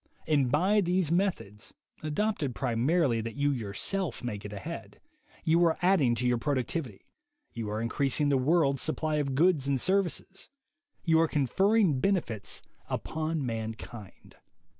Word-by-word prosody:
And 140 -5 +2
by 190 +8 +3
these 180 -3 +1
methods, 170 - -2 0.3
adopted 155 - -1
primarily 130 +1 +1
that 115 0 -6
you 145 0 +1
yourself 135 - -2
may 105 -4 -3
get 105 0 -8
ahead, 155 +12 -7 0.4
you 165 +1 +3
are 165 -2 +3
adding 165 -11 +4
to 125 +2 -2
your 125 -1 +2
productivity; 130 - -2 0.5
you 115 -3 -4
are 105 +1 -2
increasing 140 +5 +1
the 140 - +3
world's 140 -1 +2
supply 155 -1 0
of 140 -3 -1
goods 155 -2 +3
and 140 -2 +1
serv 195 +7 +3
ices; 195 +3 -7 0.5
you 160 -1 +4
are 165 - +3
conferring 175 - +2
benefits 130 - -1 0.3
upon 160 -2 -2
mankind. 110 -2 -7
145 Hz, 140 wpm, -29 LUFS, 120-170 Hz, 0.5 s, adding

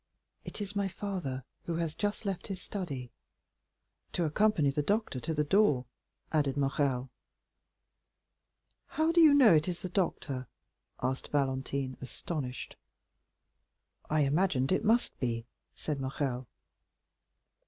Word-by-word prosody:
"It - - -7
is 205 0 -5
my 200 -1 +1
father, 180 -10 -4 0.2
who 170 - -2
has 165 -2 -1
just 205 +4 -2
left 190 -3 -3
his 195 -2 -4
study." 145 - -5 1.0
"To 175 - +1
accompany 160 -3 +3
the 150 - 0
doctor 205 - 0
to 160 - -3
the 150 -1 +1
door," 150 -6 +3 0.5
added 145 -3 +1
Morrel. 135 -2 +1 1.8
"How 315 +1 +1
do 340 0 +5
you 315 -2 +9
know 250 -9 +8
it 155 +1 +4
is 175 -1 -3
the 185 - -3
doctor?" 145 - -1 0.6
asked 130 +1 -1
Valentine, 135 -1 -1
astonished. 130 0 -5 1.3
"I 155 0 +3
imagined 140 -1 +2
it 190 - +2
must 230 +3 +2
be," 115 -2 -1 0.3
said 145 -3 -3
Morrel. 130 -2 -2
150 Hz, 125 wpm, -31 LUFS, 135-195 Hz, 1.8 s, you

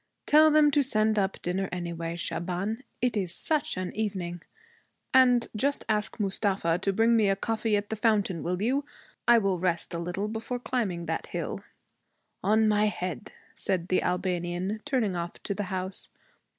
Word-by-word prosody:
'Tell 310 +1 +7
them 300 -1 +5
to 290 0 +4
send 215 -5 +2
up 195 -1 -1
dinner 185 +2 -1
anyway, 170 -1 -4
Shaban. 180 +7 -2 0.2
It 250 -2 +2
is 185 -5 -2
such 305 -9 -1
an 185 -1 -4
evening! 190 -5 -3 0.7
And 250 -2 +5
just 275 +6 0
ask 210 +1 -1
Mustafa 190 -4 0
to 195 +1 0
bring 225 +4 +3
me 215 -3 +4
a 195 - +3
coffee 220 +1 0
at 205 +1 -4
the - - 0
fountain, 205 -6 +1
will 180 +3 -2
you? 270 +5 +1 0.4
I 240 0 +8
will 195 -5 +1
rest 175 -1 -1
a 170 - -2
little 180 +4 -2
before 225 +3 -4
climbing 215 -9 -2
that 160 0 -3
hill.' - - -4 0.8
'On 215 +3 +4
my 210 0 +3
head!' 180 -9 -3 0.2
said 185 -3 -2
the 185 - +3
Albanian, 180 +3 -1
turning 225 -9 0
off 170 0 -3
to 200 - -2
the 205 +1 -3
house. 185 0 -2
200 Hz, 170 wpm, -28 LUFS, 180-225 Hz, 0.8 s, I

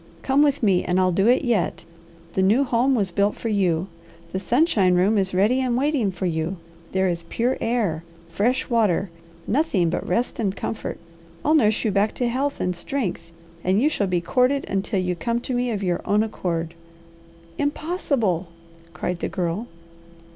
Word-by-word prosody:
Come 270 +2 +3
with 285 -3 +2
me, 190 -4 +3
and 180 +1 +1
I'll 185 0 +3
do 195 +4 +2
it 250 +4 +4
yet. 230 -8 0 0.5
The 190 - +1
new 215 +9 +4
home 255 +1 +2
was 200 -6 0
built 200 +4 +1
for 230 - -4
you. 185 -4 +1 0.4
The 190 - -2
sunshine 210 - +3
room 190 +5 +3
is 195 -2 +1
ready 210 +8 +2
and 245 -2 0
waiting 275 -6 +1
for 190 0 -4
you. 165 +2 -1 0.3
There 190 0 +1
is 170 -1 -1
pure 245 +3 0
air, 210 -9 0 0.2
fresh 205 +10 0
water, 205 -6 +1 0.3
nothing 210 - +1
but - - -3
rest 235 +8 -1
and 200 -4 0
comfort. 225 - -4 0.5
I'll 305 - +4
nurse 220 -7 +3
you 215 - +2
back 200 +2 +1
to 245 - 0
health 270 +4 -1
and 180 0 -1
strength, 185 -2 -3 0.3
and 190 +3 +2
you 285 +6 +3
shall 205 -10 0
be 180 -2 0
courted 255 +9 +1
until 195 +1 -1
you 180 -1 -1
come 235 +6 -1
to 255 - -4
me 245 0 0
of 205 -4 -2
your 175 -2 0
own 210 +1 +2
accord." 170 -6 -3 0.9
"Impossible!" 285 - -1 0.5
cried 175 0 -3
the - - -2
girl. 180 +6 -2
205 Hz, 180 wpm, -23 LUFS, 180-250 Hz, 0.9 s, it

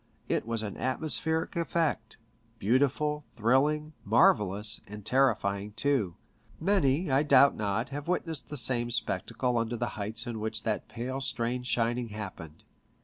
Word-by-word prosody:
It - - -1
was 115 -1 -2
an 105 -3 -5
atmospheric 160 +4 0
effect, 160 -9 -1 0.4
beautiful, 145 +7 +1
thrilling, 145 +7 +1
marvellous, 105 0 +3
and 105 0 -10
terrifying 105 -6 +1
too. 115 -7 0 0.4
Many, 165 -4 +1
I 135 +2 +4
doubt 140 -2 +5
not, 105 +3 -2
have 145 +2 -6
witnessed 165 -4 -2
t}ie 150 - -1
same 120 -1 +3
spectacle 115 +2 -1
under 115 +1 -2
the - - -2
heights 110 +3 0
in 120 -3 -5
which 110 +1 -1
that 110 -1 -2
pale 125 +4 -5
strange 125 0 -1
shining 120 0 0
happened. 95 -7 -8
120 Hz, 140 wpm, -29 LUFS, 110-140 Hz, 0.4 s, doubt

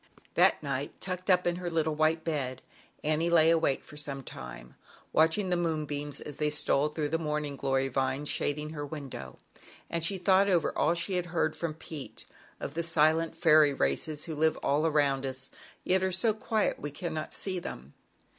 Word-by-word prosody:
That - - +4
night, - - -3
tucked 185 0 -4
up 180 -1 +4
in 175 0 +1
her 180 -1 -3
little 160 -2 +1
white 155 +1 +2
bed, 135 -6 -3 0.4
Annie 155 +3 +1
lay 165 -1 +6
awake 160 -5 +2
for - - -13
a 150 0 -2
long 135 -1 -5
time, 65 - -9 0.4
watching 165 +5 +3
the - - +4
moonbeams 150 -4 -2
as 145 - -8
they 150 -1 +1
stole 150 -1 +1
through 150 -1 -2
the 165 +2 0
morning 150 -2 -2
glory 135 0 0
vines 135 +2 -1
shading 150 +2 -1
her 150 -2 -5
window, 135 - -7 0.5
and 170 -1 -1
she 195 +4 +2
thought 190 +2 +4
over 175 -4 +2
all 170 - +2
she 180 +2 0
had 175 -1 -2
heard 170 -1 0
from 165 -3 -3
Pete, 155 -3 -9 0.3
of 140 - -5
the 165 - -1
silent 165 0 +2
fairy 155 -4 +5
races 140 - -1
who 160 - -5
live 160 +1 +2
all 150 +3 +2
around 145 -3 +2
us, 130 -1 -3 0.3
yet 185 +1 +3
are 190 0 +1
so 200 +5 +3
quiet 215 0 0
that - - -17
we 145 - -3
cannot 155 +1 -4
see 185 -2 -2
them. 70 - -8
155 Hz, 195 wpm, -30 LUFS, 145-170 Hz, 0.5 s, lay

